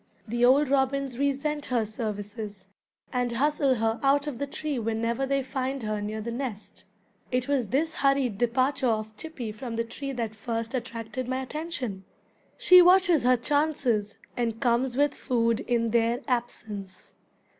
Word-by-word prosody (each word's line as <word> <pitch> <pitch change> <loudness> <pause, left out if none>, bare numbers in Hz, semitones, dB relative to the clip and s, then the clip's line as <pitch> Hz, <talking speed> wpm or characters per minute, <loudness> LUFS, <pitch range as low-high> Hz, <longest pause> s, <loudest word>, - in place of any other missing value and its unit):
The 240 +2 -1
old 270 +4 +5
robins 270 -1 0
resent 285 +1 0
her 240 -3 +1
services, 210 -2 -6 0.5
and 245 -1 0
hustle 280 +1 +2
her 225 0 0
out 280 +1 +3
of 280 -5 -5
the 280 - -2
tree 290 -1 -3
whenever 230 +3 -1
they 275 0 +1
find 265 0 -3
her 215 -1 -2
near 215 +1 -4
the 235 +2 -4
nest. 235 -4 -6 0.5
(It 250 0 0
was 275 -5 +1
this 310 +8 0
hurried 275 -8 +1
departure 255 +3 +1
of 215 -1 -1
Chippy 250 -4 -6
from 230 +2 -6
the 230 - 0
tree 275 +4 -6
that 230 -4 -3
first 230 +2 -4
attracted 235 -1 -4
my 260 +1 -1
attention.) 260 - -5 0.5
She 365 0 +8
watches 355 -3 +5
her 250 0 +5
chances, 255 -6 0 0.2
and 230 -2 -1
comes 245 0 +1
with 290 0 +3
food 230 -2 0
in 230 -2 0
their 235 +2 +2
absence. 220 -6 -4
245 Hz, 155 wpm, -27 LUFS, 225-275 Hz, 0.5 s, She